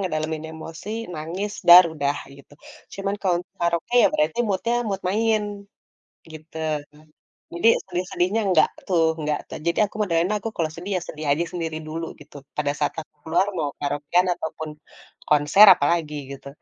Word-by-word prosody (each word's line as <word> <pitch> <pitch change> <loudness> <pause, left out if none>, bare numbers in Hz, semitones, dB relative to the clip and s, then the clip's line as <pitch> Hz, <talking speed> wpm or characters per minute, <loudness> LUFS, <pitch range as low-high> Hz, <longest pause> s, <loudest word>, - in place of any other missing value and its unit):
ngedalemin 155 -4 -3
emosi, 160 +4 -9 0.2
nangis, 175 +7 -4
duar 175 +1 +11
udah 145 -1 -1 0.2
gitu. 140 +1 -18 0.4
Cuma 195 0 -3
kalau 185 -3 +1
untuk 180 +2 -18
karaoke, 170 +7 -1
ya, - - +6
berarti 155 +7 0
mood-nya, 205 +4 0
mood 195 -1 -2
main, 220 +2 +1 0.9
gitu, 155 +1 -11 1.0
jadi 195 +7 +4 0.2
sedih-sedihnya 180 +3 -1
enggak 185 - +4 0.2
tuh 175 -3 +3 0.2
enggak 150 -1 -1 0.3
jadi 170 - +1
aku - - -23
modelnya 175 +3 +1 0.2
kalau 160 -2 -1
sedih, 180 +4 -7
ya, - - -4
sedih 155 0 -7
aja 160 +4 0
sendiri 165 -3 -3
dulu 165 +2 -4
gitu. 150 0 -17 0.2
Pada 145 -1 0
saat 150 - 0
aku 155 - -19
keluar 170 +5 +2
mau 150 -3 -1
karaokean 145 +5 +1
ataupun 160 -2 -6 0.6
konser 150 +8 +6
apalagi 155 -1 0 0.2
gitu 140 0 -10
165 Hz, 150 wpm, -23 LUFS, 155-185 Hz, 1.0 s, duar